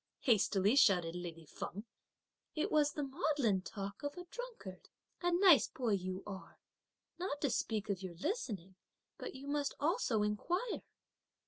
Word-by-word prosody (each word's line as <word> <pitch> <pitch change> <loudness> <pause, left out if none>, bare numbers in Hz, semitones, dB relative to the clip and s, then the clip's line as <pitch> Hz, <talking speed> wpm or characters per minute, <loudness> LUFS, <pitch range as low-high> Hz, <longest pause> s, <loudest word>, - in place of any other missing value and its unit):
hastily 210 -2 +4
shouted 180 -10 +5
lady 170 -2 -6
Feng; 200 +7 -6 0.7
"it 310 - 0
was 295 -1 +4
the 295 - -2
maudlin 270 - +1
talk 200 +1 -6
of 285 +3 -4
a 355 - -6
drunkard! 455 - -8 0.3
A 350 0 +2
nice 350 -4 +7
boy 245 -4 -2
you 185 -1 -1
are! 195 -2 -8 0.6
not 350 -5 -2
to 280 - +2
speak 220 -2 -1
of 200 -3 -1
your 185 -3 -6
listening, 195 - -3 0.5
but - - -6
you 265 +1 -8
must 285 0 0
also 290 - +2
inquire! 350 - -1
225 Hz, 145 wpm, -36 LUFS, 190-300 Hz, 0.7 s, nice